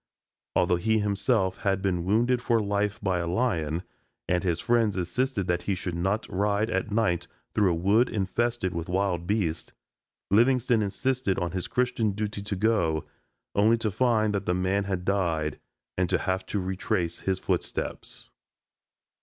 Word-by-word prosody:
Although 90 -1 +3
he 110 +5 +1
himself 100 -1 +1
had 100 -3 0
been 95 -3 0
wounded 120 +5 +2
for 115 -1 +2
life 105 0 -1
by 95 -3 +1
a 85 - -2
lion 85 -5 0 0.4
and 90 0 +1
his 85 -3 0
friends 115 -4 +2
insisted 105 +4 -1
that 85 0 0
he 100 - +2
should 90 -1 -4
not 95 +6 -1
ride 105 +3 0
at 95 +3 -1
night 100 -5 +1 0.3
through 105 -3 +3
a 85 - +1
wood 100 +8 +3
infested 105 0 -1
with 85 0 -4
wild 90 -2 0
beasts, 90 -6 -1 0.6
Livingstone 120 +1 +4
insisted 105 +1 0
on 90 -2 -1
his 90 -1 -3
Christian 125 -4 0
duty 105 0 -3
to 100 0 -3
go, 90 -7 +1 0.5
only 110 +3 +4
to 110 -2 -1
find 110 -1 +2
that 100 -1 -2
the 90 - +2
man 95 +2 0
had 95 -2 -3
died 85 -6 0 0.4
and 90 -1 +1
to - - +3
have 95 -1 -2
to 105 - -1
retrace 95 -1 -2
his 95 -1 -1
footsteps. - - -3
100 Hz, 160 wpm, -27 LUFS, 90-110 Hz, 0.6 s, Livingstone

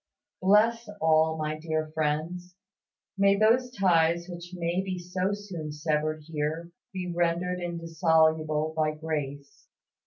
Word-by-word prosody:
Bless 215 +4 +3
all 160 0 +3
my 155 0 -3
dear 155 -1 -2
friends; 160 +4 -2 0.6
may 200 0 +5
those 230 +5 +3
ties 170 -6 +2
which 175 -1 -8
may 175 0 -1
be 190 -1 -4
so 180 +2 -2
soon 190 -7 -5
severed 155 0 -1
here 160 +2 -3 0.2
be 180 -2 -4
rendered 175 +1 0
indissoluble 160 -2 +1
by 155 -1 +1
grace. 145 -3 -5
165 Hz, 120 wpm, -28 LUFS, 155-180 Hz, 0.6 s, may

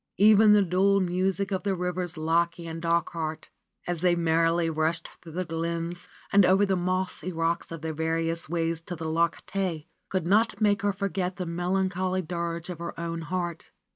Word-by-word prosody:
Even 210 +1 +7
the 205 -1 +6
dual 195 +2 +3
music 190 +2 0
of 190 -1 0
the 195 0 0
rivers 180 -1 -2
Lochay 170 +2 0
and 165 0 -6
Dochart, 165 -1 -1 0.4
as 175 -2 -2
they 180 -1 +4
merrily 165 0 +2
rushed 160 +1 -1
through 165 -2 -11
the 185 +2 -2
glens 170 +1 -3 0.3
and 200 0 +7
over 190 +3 +5
the 195 -1 +1
mossy 185 0 -2
rocks 165 0 -1
on 165 -2 -6
their 160 0 -3
various 165 +1 -1
ways 165 -1 -1
to 175 +1 -6
the 165 0 -6
Loch 165 +1 0
Tay, 180 -6 -2 0.2
could 185 -3 -1
not 205 +2 +3
make 205 -2 +3
her 205 0 +2
forget 195 -2 -2
the 180 - -4
melancholy 185 +2 -1
dirge 170 +1 -3
in 170 - -8
her 170 -1 -6
own 170 0 -3
heart. 175 0 -4
175 Hz, 180 wpm, -27 LUFS, 165-185 Hz, 0.4 s, Even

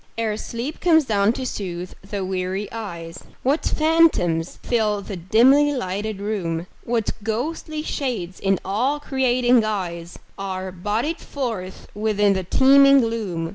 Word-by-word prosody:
Ere 220 -2 0
sleep 235 +7 -5
comes 320 -4 +4
down 205 -2 +2
to 260 +1 -4
soothe 180 -6 -5
the 195 0 -4
weary 190 +2 -2
eyes, 170 -6 -7 0.2
What 280 +5 +1
phantoms 305 - +2
fill 215 -4 0
the 200 - -6
dimly 255 - +4
lighted 205 -2 -3
room; 180 -5 -2 0.2
What 230 -2 -1
ghostly 305 +8 -3
shades 225 - -3
in 195 -1 +2
awe 240 +10 0
creating 255 -3 +2
guise 180 -6 -3 0.2
Are 190 -1 -4
bodied 210 - -2
forth 225 -9 -5
within 210 -1 +2
the 190 - -1
teeming 275 +6 +6
gloom. 205 -8 -2
215 Hz, 135 wpm, -22 LUFS, 185-255 Hz, 0.2 s, teeming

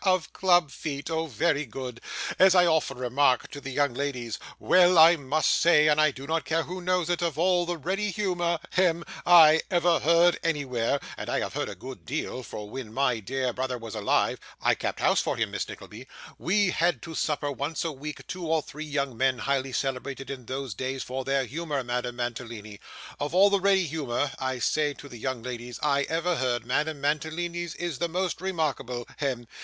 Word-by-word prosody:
Of 185 -4 +1
club 175 -5 +3
feet! 145 +1 -5
Oh 160 0 -1
very 150 +2 +1
good! 125 -2 -7 0.4
As 190 0 +7
I 180 -1 +6
often 160 -5 +1
remark 130 +1 +1
to 145 - -8
the 135 - -6
young 140 -1 +1
ladies, 125 -4 -3 0.2
"Well 180 -1 +5
I 165 +2 +9
must 150 +1 +1
say, 155 -3 +5
and 150 0 +4
I 155 - +5
do 135 -1 -9
not 160 +2 -1
care 165 +1 0
who 180 +3 -6
knows 180 -2 +1
it, 175 0 0
of 165 -4 -1
all 175 +1 +2
the 175 -1 -2
ready 190 +7 -1
humour 175 -4 0
hem 170 -2 +2 0.2
I 160 -2 +8
ever 175 -2 +3
heard 170 +2 +4
anywhere" 140 -5 0 0.2
and - - -6
I - - +1
have - - -4
heard - - -2
a - - -7
good 130 0 -9
deal; 130 -1 -3
for 105 -4 -7
when 115 0 -7
my 125 -1 +1
dear 130 +3 -2
brother 130 0 -2
was 115 -2 -8
alive 105 -2 +1 0.2
(I - - +3
kept - - -3
house - - +3
for - - -2
him, - - -1
Miss - - -3
Nickleby), - - -10 0.3
we 200 +1 +2
had 170 -8 +1
to 165 - -7
supper 150 -2 -1
once 145 +5 -3
a 165 - -1
week 150 +2 -8
two 180 -2 -5
or 160 -1 +1
three 155 +2 -8
young 140 -4 -2
men, 130 +1 +2
highly 135 +1 -1
celebrated 135 +1 -3
in 125 -4 -8
those 130 -3 -4
days 130 +5 -3
for 130 +1 -4
their 135 0 +1
humour, 150 +1 -3
Madame 120 0 -3
Mantalini 115 -4 -5 0.4
"Of 145 +4 -3
all 200 +2 +6
the 200 -1 +2
ready 195 -1 +3
humour," 145 -3 -2
I 130 -1 -2
say 145 +3 0
to 145 - -11
the 120 -4 -10
young 130 -1 -3
ladies, 120 -1 -6
"I 140 -1 +2
ever 170 +1 0
heard, 125 -2 -1
Madame 145 +4 -1
Mantalini's 165 +3 -2
is 170 -6 -4
the 170 - 0
most 180 0 -2
remarkable 150 -10 -2
hem. 130 -4 -2
145 Hz, 200 wpm, -27 LUFS, 130-170 Hz, 0.4 s, I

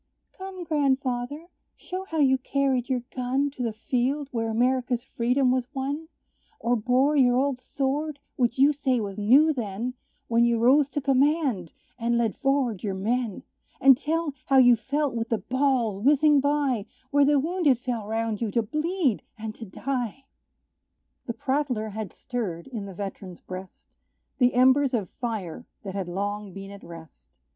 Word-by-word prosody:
"Come, 380 -1 -7
grandfather, 275 -2 -1 0.3
show 370 +1 -6
how 325 -4 -5
you 265 -3 +4
carried 265 -1 0
your 250 -2 0
gun 265 +3 0
To 265 - -8
the 235 -2 0
field, 260 +6 -1
where 225 -3 -1
America's 245 +1 +1
freedom 250 +1 +1
was 255 -1 0
won, 285 +4 -3 0.5
Or 240 +1 +1
bore 255 +6 +2
your 250 -3 +4
old 270 -1 +1
sword, 280 +3 -2 0.2
which 240 -1 +1
you 280 +3 +5
say 265 -3 0
was 205 -1 -4
new 275 +10 +5
then, 230 0 -3 0.3
When 230 0 +3
you 235 -1 +3
rose 265 +5 +4
to 290 - -3
command, 270 - +1 0.3
and 235 0 +1
led 230 -3 0
forward 270 -7 0
your 200 -3 -2
men; 230 +3 -1 0.4
And 270 -1 +7
tell 310 +2 -2
how 270 - +4
you 245 -2 +7
felt 280 +5 -1
with 230 -1 -3
the 225 - +1
balls 245 -2 0
whizzing 290 +4 +4
by, 280 -6 0 0.2
Where 285 0 +5
the 285 0 +4
wounded 315 -3 +2
fell 240 -4 -4
round 225 -1 -2
you, 230 - 0
to 230 - +2
bleed 305 - 0 0.2
and 220 0 -5
to 225 - -9
die!" 250 +4 -4 1.0
The 235 - -3
prattler 260 -6 -1
had 210 -2 -5
stirred, 200 -9 -5
in 225 -6 -6
the 195 - -9
veteran's 195 -2 -7
breast, 185 0 -10 0.5
The 250 -1 +3
embers 260 +1 +4
of 205 -6 -3
fire 225 -4 -5 0.2
that 195 -2 -6
had 195 -2 -3
long 200 +2 -3
been 195 0 -8
at 200 - -11
rest. 160 - -13
250 Hz, 165 wpm, -26 LUFS, 220-280 Hz, 1.0 s, And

